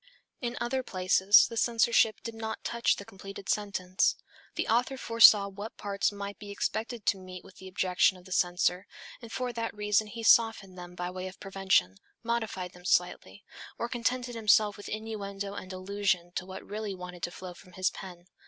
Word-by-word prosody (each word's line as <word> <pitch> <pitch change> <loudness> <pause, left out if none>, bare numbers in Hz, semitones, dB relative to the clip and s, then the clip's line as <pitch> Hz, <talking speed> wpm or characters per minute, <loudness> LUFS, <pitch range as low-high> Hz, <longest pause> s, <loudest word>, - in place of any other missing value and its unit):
In 245 -1 -3
other 260 +2 -1
places 190 -2 +5
the 230 - -7
censorship 230 -1 +3
did 230 - -5
not 220 0 -5
touch 235 0 +1
the 200 - -9
completed 195 0 -10
sentence. 185 -3 +1 0.4
The - - -1
author 245 +4 +1
foresaw 230 -4 +7
what 200 +3 -8
parts 200 0 -1
might 200 0 -7
be 205 - -9
expected 220 +2 -3
to 195 - +2
meet 185 -1 -10
with 190 - -16
the 190 - -11
objection 185 0 +2
of 180 - -17
the 185 - -13
censor, 180 +1 +1 0.3
and 230 -2 -10
for 250 0 -3
that 230 -1 -4
reason 210 +1 +1
he 230 +2 -7
softened 225 -4 +4
them 180 -1 -10
by 180 0 -4
way 185 0 -5
of 185 - -11
prevention, 190 - +1 0.3
modified 220 -6 -2
them 180 - -15
slightly, 175 - 0 0.3
or 235 - -2
contented 245 +1 -2
himself 215 -2 +3
with 205 - -9
innuendo 200 -2 -5
and 190 -2 -8
allusion 185 -2 -1
to 180 +1 -5
what 190 0 -8
really 210 -1 -4
wanted 180 -1 -9
to - - -2
flow 180 0 -9
from 180 +1 -17
his 185 +1 0
pen. 180 -2 -10
200 Hz, 185 wpm, -29 LUFS, 185-225 Hz, 0.4 s, foresaw